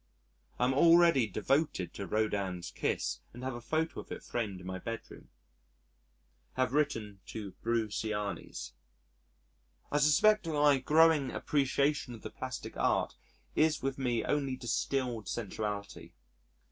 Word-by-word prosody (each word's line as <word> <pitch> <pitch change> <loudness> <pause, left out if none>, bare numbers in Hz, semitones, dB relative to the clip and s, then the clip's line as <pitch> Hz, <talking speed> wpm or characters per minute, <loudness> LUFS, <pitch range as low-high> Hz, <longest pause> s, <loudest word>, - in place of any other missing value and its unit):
I 125 - +2
am 130 - +2
already 165 -4 +6
devoted 105 - 0
to 100 - -5
Rodin's 100 -4 -1
"Kiss" - - -1
and 125 +2 -9
have 130 0 -2
a 120 - -7
photo 160 +6 -1
of - - -10
it - - -6
framed 105 -6 -3
in 90 - -11
my 95 0 -4
bedroom. 115 +4 -7 1.2
Have 130 0 0
written 115 -9 0
to 105 -3 -6
Bruciani's. 105 - -2 1.2
I 145 - +2
suspect 210 +8 +5
that 165 - -2
my 145 -2 +4
growing 155 0 +4
appreciation 140 -2 0
of 110 - -14
the - - -6
plastic - - -6
art - - +1 0.4
is 155 -2 +2
with 135 0 -2
me 120 -3 0
only 140 -3 0
distilled 125 -2 -2
sensuality. 105 -2 -4
125 Hz, 135 wpm, -32 LUFS, 105-145 Hz, 1.2 s, already